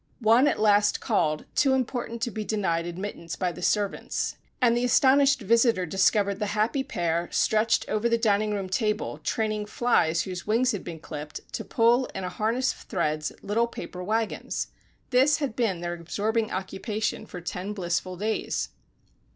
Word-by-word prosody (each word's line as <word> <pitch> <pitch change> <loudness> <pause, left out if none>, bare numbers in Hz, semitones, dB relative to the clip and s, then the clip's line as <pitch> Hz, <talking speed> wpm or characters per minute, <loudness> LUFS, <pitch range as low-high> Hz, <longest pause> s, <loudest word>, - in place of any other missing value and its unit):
One 235 +4 +5
at - - +1
last 205 -1 +4
called, 155 -2 0
too 275 -2 +3
important 240 -2 -2
to 240 - -1
be 215 -1 -4
denied 180 -6 -1
admittance 175 -1 -5
by 180 -2 -1
the 180 - -10
servants, 205 +2 -1 0.2
and 240 -3 +4
the 240 - +1
astonished 275 +2 +4
visitor 230 -2 +3
discovered 195 +2 +2
the 210 - -1
happy 235 +6 +1
pair 170 -5 -1
stretched 220 +1 +2
over 215 +2 0
the 230 - +3
dining 215 -2 +2
room 200 -2 -2
table, 210 +2 -1
training 215 -2 -1
flies 170 -8 +2
whose 185 -1 -6
wings 240 +4 +3
had 205 - -4
been 165 -2 -7
clipped, 150 -1 -7
to - - -3
pull, 240 +2 +3
in 190 - -3
a 180 - -2
harness 225 +8 0
of - - -17
threads, 155 -3 -2
little 230 +3 +1
paper 180 -5 -7
wagons! 220 +3 -2 0.4
This 265 +4 +4
had 280 -7 -3
been 205 -8 0
their 175 0 -2
absorbing 210 +6 -1
occupation 205 +3 -3
for 180 - -7
ten 180 +3 -5
blissful 180 -1 -2
days! 215 +3 -2
210 Hz, 165 wpm, -26 LUFS, 180-230 Hz, 0.4 s, One